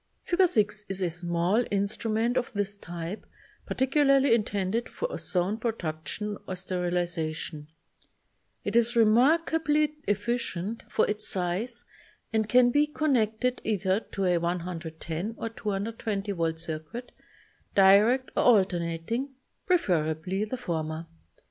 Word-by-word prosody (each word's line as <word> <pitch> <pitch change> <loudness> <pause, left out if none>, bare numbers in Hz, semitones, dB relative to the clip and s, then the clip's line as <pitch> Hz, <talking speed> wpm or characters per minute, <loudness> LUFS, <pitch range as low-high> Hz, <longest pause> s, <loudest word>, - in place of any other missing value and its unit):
Fig. 365 +1 +3
6 210 - 0
is 195 0 -2
a 175 - 0
small 175 +6 +1
instrument 215 +4 0
of 250 - 0
this 205 -1 -1
type, 175 +1 -6 0.4
particularly 275 -1 +3
intended 210 0 0
for - - -3
ozone 190 +4 0
production 210 -1 -3
or 185 - -3
sterilization. 175 -4 -2 1.0
It 205 - -3
is 235 +1 +3
remarkably 300 +6 +3
efficient 205 -1 -1
for - - +3
its 210 0 -1
size 195 +7 -2 0.5
and 220 -1 +1
can 245 -1 +5
be 290 +3 +3
connected 250 -5 0
either 195 -2 +1
to 195 - -1
a 175 -1 +3
110 170 +2 -4
or 225 - -3
220 210 -1 -3
volt 165 -3 -1
circuit, 160 +9 -6 0.6
direct 205 +7 +5
or - - +3
alter 195 -7 +4
nating, 170 +11 -3 0.4
preferably 180 - +1
the 255 +4 -4
former. 160 -7 -3
205 Hz, 115 wpm, -28 LUFS, 175-235 Hz, 1.0 s, can